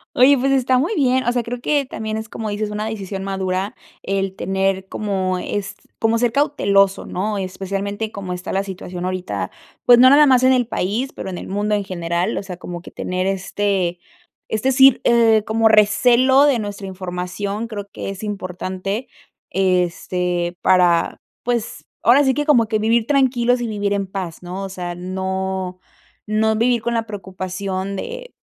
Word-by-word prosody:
Oye, 265 +3 +6
pues 270 +2 +1
está 260 -1 +3
muy 335 +11 0
bien. 260 -3 +2
O 240 - +2
sea, 245 -1 0
creo 240 +1 -5
que 285 -1 +1
también 220 -3 -4
es 220 0 -6
como 220 -2 -5
dices 210 0 -3
una 210 +1 -3
decisión 195 -3 -5
madura 190 0 -2 0.3
el 195 -1 -2
tener 190 0 -1
como 190 -3 -2
es, 200 +2 -4 0.2
como 225 0 +2
ser 240 -1 +1
cauteloso, 200 -9 +2
¿no?, 205 +3 -2
especialmente 200 +3 -3
como 190 -2 -5
está 180 0 -6
la 195 +1 0
situación 180 -2 -6
ahorita. 185 0 -3 0.3
Pues 240 -1 +7
no 255 +1 +8
nada 295 +2 +7
más 260 -3 +5
en 260 - +6
el 250 -1 +2
país, 230 +7 -2
pero - - -5
en 180 - -5
el - - -7
mundo 205 +2 0
en 205 - -1
general. 175 +2 -2
O - - -7
sea, 180 -2 -7
como 175 -1 -7
que - - -11
tener 185 +1 -3
este, 195 -2 -1 0.5
es 220 -1 -3
decir, 265 0 +6
eh, 225 -2 +4
como 220 0 +3
recelo 245 +6 +5
de 275 -4 +3
nuestra 205 -2 -5
información, 190 +4 -4
creo 205 -3 -6
que - - -6
es 195 +2 -7
importante 195 +2 -4 0.4
este 180 -1 0
para, 175 -2 +3 0.2
pues 235 -2 -2 0.2
ahora 260 +5 +5
sí 265 -1 +3
que 295 +2 -1
como 235 -7 +4
que 215 -1 0
vivir 225 +1 +2
tranquilos 250 -3 +2
y 235 - -2
vivir 205 -1 -1
en 200 -1 -1
paz, 185 -4 -6
¿no?, 180 +2 -6
o 195 - -5
sea, 175 -2 -5
no 190 0 -3 0.5
no 220 +1 +1
vivir 235 +1 +2
con 235 - -1
la 225 -1 0
preocupación 190 0 -4
de - - -7
205 Hz, 180 wpm, -20 LUFS, 185-235 Hz, 0.5 s, no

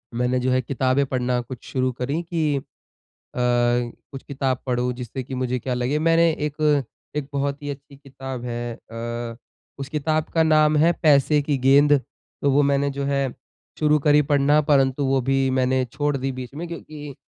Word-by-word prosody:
मैंने 125 +1 +1
जो 125 +1 0
है 130 0 +2
किताबें 130 +2 +1
पढ़ना 125 -1 -1
कुछ 120 0 -9
शुरू 130 -1 0
करी 130 +6 -3
कि 160 -4 0
अ, - - -3 0.8
कुछ 120 +2 0
किताब 135 -2 -2
पढ़ूँ 125 -1 0
जिससे 125 +1 -6
कि 130 +1 -7
मुझे 125 0 -1
क्या 125 +2 -3
लगे 125 +4 0
मैंने 165 +1 +4
एक, 150 -2 0 0.3
एक 150 -2 -2
बहुत 140 0 -2
ही 145 - -4
अच्छी 140 0 -8
किताब 135 -2 -8
है 120 -1 -4 0.2
अ, 115 0 -5 0.4
उस 135 0 -5
किताब 155 +1 -1
का 165 -1 +4
नाम 155 -1 +4
है 165 +3 +5
पैसे 150 0 +4
की 145 0 -1
गेंद। 140 +3 +5 0.5
तो 140 - +2
वो 140 +2 +4
मैंने 140 0 +2
जो 140 0 -4
है 140 -1 0 0.5
शुरू 150 -1 +4
करी 150 +1 +4
पढ़ना, 145 +1 +3
परंतु 140 -2 +2
वो 135 0 +2
भी 135 +1 +1
मैंने 130 0 +1
छोड़ 145 0 -1
दी 135 0 -2
बीच 130 0 -8
में 170 +3 -5
क्योंकि 150 -4 -8
135 Hz, 180 wpm, -23 LUFS, 125-145 Hz, 0.8 s, है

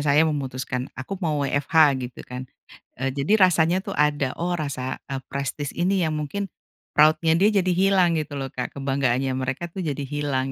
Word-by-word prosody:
saya 150 +2 +4
memutuskan 130 -3 -3
aku 180 +9 -6
mau 150 -4 0
WFH 140 +3 -2 0.3
gitu 125 -1 -7
kan, 125 +1 -7 0.5
eee, 135 0 0
jadi 150 +11 +2
rasanya 170 +1 +2
tuh 195 - -5
ada 145 -3 +1
oh 175 +1 -1
rasa, 130 -3 -3
eee, 135 -1 -3
prestise 140 +1 -3
ini 185 +1 +2
ya 160 - 0
mungkin, 155 +7 -3 0.5
proud-nya 155 +2 +5
dia 200 - +5 0.2
jadi 185 - +1
hilang 185 -2 +3
gitu 145 -1 -5
loh, 135 -2 -4
Kak, 125 - -5
kebanggaannya 135 -1 0
mereka 135 +6 -3
tuh 190 - -7
jadi 145 -2 -2
hilang 140 -2 -2
145 Hz, 175 wpm, -24 LUFS, 135-165 Hz, 0.5 s, proud-nya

